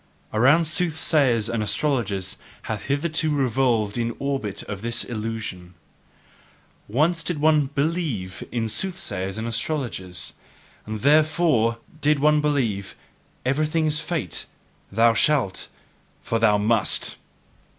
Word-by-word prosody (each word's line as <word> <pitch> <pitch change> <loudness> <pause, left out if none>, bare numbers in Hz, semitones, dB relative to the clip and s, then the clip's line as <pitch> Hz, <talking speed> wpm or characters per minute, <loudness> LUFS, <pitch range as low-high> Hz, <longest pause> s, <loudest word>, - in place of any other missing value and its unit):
Around 140 +10 +5
soothsayers 155 - +2
and 115 -1 -1
astrologers 105 -5 -1 0.3
hath 110 -2 -4
hitherto 155 +2 +1
revolved 125 -6 +1
the 115 -1 0
orbit 135 -8 -2
of 100 -2 -6
this 120 +1 -1
illusion. 105 -6 -5 1.1
Once 155 +10 +2
did 165 -3 -2
one 150 -2 +4
BELIEVE 140 - -2
in 115 -2 -1
soothsayers 110 - -2
and 110 +1 -3
astrologers; 115 - -3 0.5
and 110 -1 -4
THEREFORE 150 -5 +3 0.2
did 150 +1 +3
one 150 +1 +4
believe, 120 -10 -1 0.5
"Everything 155 +4 +1
is 155 0 +1
fate: 155 - -3 0.4
thou 115 +3 +4
shalt, 125 -5 +1 0.5
for 115 - -1
thou 105 -2 +4
must!" 105 0 +1
125 Hz, 110 wpm, -24 LUFS, 110-150 Hz, 1.1 s, Around